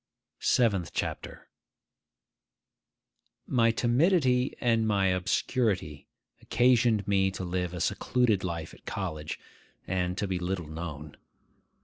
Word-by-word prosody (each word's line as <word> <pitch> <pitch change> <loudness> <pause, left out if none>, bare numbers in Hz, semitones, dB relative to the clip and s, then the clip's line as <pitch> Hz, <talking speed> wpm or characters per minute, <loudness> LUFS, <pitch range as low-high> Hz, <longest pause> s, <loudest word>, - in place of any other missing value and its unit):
SEVENTH 100 -9 +2
CHAPTER - - -4 2.0
MY 115 -3 +3
timidity 125 +2 +2
and 115 -2 +2
my 100 -3 +2
obscurity 90 - -1 0.3
occasioned 120 -4 +3
me 95 -1 +3
to 95 0 -6
live 90 0 -2
a 90 - -6
secluded 115 0 +1
life 85 -3 -4
at - - -18
college, 80 -6 -4 0.5
and 90 0 -1
to 105 - -1
be 95 -1 -2
little 90 -1 -3
known. 75 -2 -7
95 Hz, 105 wpm, -28 LUFS, 90-120 Hz, 2.0 s, MY